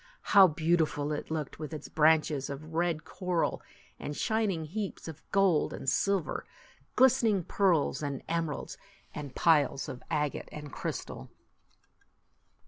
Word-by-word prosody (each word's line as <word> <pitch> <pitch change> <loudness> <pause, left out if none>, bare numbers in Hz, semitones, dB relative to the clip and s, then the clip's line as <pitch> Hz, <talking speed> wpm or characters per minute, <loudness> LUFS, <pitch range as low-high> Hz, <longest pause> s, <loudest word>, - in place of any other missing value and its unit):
How 195 -2 +9
beautiful 160 -2 +1
it 150 - -4
looked, 155 -3 -4
with 155 0 -5
its 150 - -8
branches 155 -3 +2
of 155 +3 -7
red 165 -2 0
coral, 180 0 -1 0.4
and 145 - -5
shining 210 -7 0
heaps 195 +4 -5
of 160 -2 -8
gold 195 -6 +3
and - - -7
silver, 195 +4 +1 0.5
glistening 235 -7 +4
pearls 175 -6 +1
and 140 -3 -4
emeralds, 165 -3 -3 0.3
and 145 -3 -7
piles 145 -5 +3
of 125 - -7
agate 150 -2 -1
and 150 -2 -8
crystal - - -5
160 Hz, 130 wpm, -30 LUFS, 150-180 Hz, 0.5 s, How